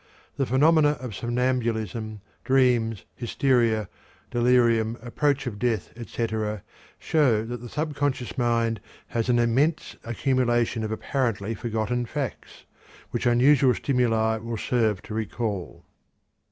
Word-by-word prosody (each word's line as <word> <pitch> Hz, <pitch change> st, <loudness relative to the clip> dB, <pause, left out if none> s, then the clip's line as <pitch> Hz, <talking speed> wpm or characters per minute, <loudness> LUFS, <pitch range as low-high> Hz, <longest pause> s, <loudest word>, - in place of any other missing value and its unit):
The 135 Hz, -2 st, -1 dB
phenomena 150 Hz, +3 st, +4 dB
of 125 Hz, -3 st, -6 dB
somnambulism, 115 Hz, -3 st, -2 dB, 0.2 s
dreams, 125 Hz, -5 st, +2 dB
hysteria, 120 Hz, -4 st, +1 dB, 0.4 s
delirium, 120 Hz, -2 st, +3 dB
approach 135 Hz, +3 st, 0 dB
of 105 Hz, -5 st, -5 dB
death, 115 Hz, -6 st, -1 dB
etc., 110 Hz, -3 st, -3 dB, 0.3 s
show 125 Hz, -9 st, +2 dB
that 120 Hz, 0 st, -6 dB
the 120 Hz, -, -8 dB
subconscious 145 Hz, -4 st, -2 dB
mind 115 Hz, -3 st, +1 dB, 0.3 s
has 115 Hz, +1 st, -1 dB
an 120 Hz, -, +4 dB
immense 130 Hz, +7 st, +1 dB
accumulation 120 Hz, -1 st, 0 dB
of 110 Hz, -, -3 dB
apparently 115 Hz, -3 st, -1 dB
forgotten 115 Hz, +2 st, -2 dB
facts, 140 Hz, -4 st, -6 dB, 0.5 s
which -, -, -1 dB
unusual 130 Hz, +2 st, +5 dB
stimuli 115 Hz, -4 st, +1 dB
will 115 Hz, +1 st, -5 dB
serve 110 Hz, -5 st, 0 dB
to -, -, -8 dB
recall. 110 Hz, -3 st, -4 dB
120 Hz, 115 wpm, -25 LUFS, 110-130 Hz, 0.5 s, unusual